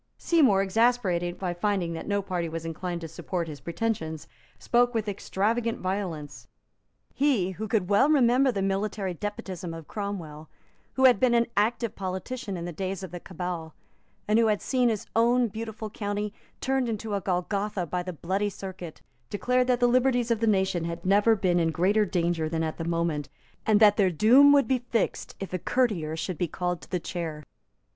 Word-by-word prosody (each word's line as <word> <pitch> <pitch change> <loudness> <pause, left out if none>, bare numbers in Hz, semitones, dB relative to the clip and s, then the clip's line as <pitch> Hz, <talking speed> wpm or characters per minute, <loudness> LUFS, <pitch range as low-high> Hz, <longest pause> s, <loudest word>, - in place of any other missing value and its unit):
Seymour, 260 - +3
exasperated 190 -5 +1
by 180 -2 -2
finding 175 -2 -1
that 165 - -6
no 200 -1 0
party 180 -4 -2
was 165 0 -5
inclined 170 +1 -4
to 165 - -5
support 170 +2 -4
his 150 -2 -7
pretensions, 170 -5 -3 0.3
spoke 245 0 +2
with 220 -1 -1
extravagant 220 +4 -1
violence. 160 -9 -4 0.7
He 250 -11 +2
who 215 +4 -5
could 210 -5 0
well 205 +9 +4
remember 260 -2 +4
the 200 -4 -2
military 195 -1 -1
despotism 180 -2 -5
of 165 -2 -10
Cromwell, 170 -7 -6 0.4
who 265 - +3
had 250 -6 +6
been 250 -2 +3
an 235 0 +4
active 230 +2 +1
politician 195 +3 -4
in 170 - -5
the 175 - -4
days 190 +3 -4
of 185 - -7
the 175 - -6
Cabal, 175 -3 -6 0.5
and 215 +2 +4
who 230 - +4
had 210 -2 +2
seen 250 -2 +1
his 215 -3 -2
own 240 +1 +3
beautiful 220 0 -6
county 205 0 -3 0.3
turned 265 -2 0
into 220 -1 -3
a 200 - 0
Golgotha 195 +1 -1
by 180 +2 -2
the 180 +1 -5
Bloody 190 +5 -1
Circuit, 185 -4 -8 0.3
declared 250 +5 +1
that 250 -1 +2
the 245 - +4
liberties 245 -1 +2
of 230 - +2
the 225 - +1
nation 190 -4 +1
had 170 +1 -5
never 205 +4 +4
been 180 -4 +1
in 165 -1 +2
greater 195 +6 +2
danger 170 -3 0
than 160 0 -1
at 160 -1 -3
that 165 - -3
moment, 165 -4 -1 0.4
and 215 -2 +5
that 210 -2 +6
their 195 -3 +4
doom 240 - +6
would 285 -1 +5
be 260 -1 +2
fixed 235 -3 -2
if 195 -1 -6
a 185 - -1
courtier 180 -7 0
should 175 0 -4
be 175 - +1
called 180 +1 -3
to - - -14
the 180 - -1
chair. 165 -3 -5
195 Hz, 190 wpm, -27 LUFS, 175-225 Hz, 0.7 s, had